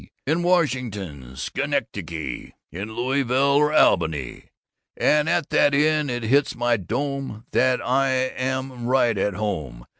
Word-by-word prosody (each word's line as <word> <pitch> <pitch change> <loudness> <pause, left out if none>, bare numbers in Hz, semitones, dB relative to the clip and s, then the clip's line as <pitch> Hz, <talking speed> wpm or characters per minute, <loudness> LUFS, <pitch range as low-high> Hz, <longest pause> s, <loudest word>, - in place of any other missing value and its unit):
in 160 +5 +1
Washington, 105 - -1
Schenectady, 80 +1 -4 0.2
in 100 +6 -6
Louisville 135 +2 +1
or 150 +1 +3
Albany. 80 - +2 0.5
And 150 +1 +3
at 170 -3 0
that 145 - +4
inn 150 0 +2
it 120 -1 -3
hits 135 +6 +2
my 120 0 +1
dome 135 - -4
that 130 0 +2
I 135 +2 +2
again 130 0 0 0.4
am 120 -2 -8
right 120 -3 +3
at 100 0 0
home. 75 - -4
125 Hz, 130 wpm, -23 LUFS, 100-140 Hz, 0.5 s, that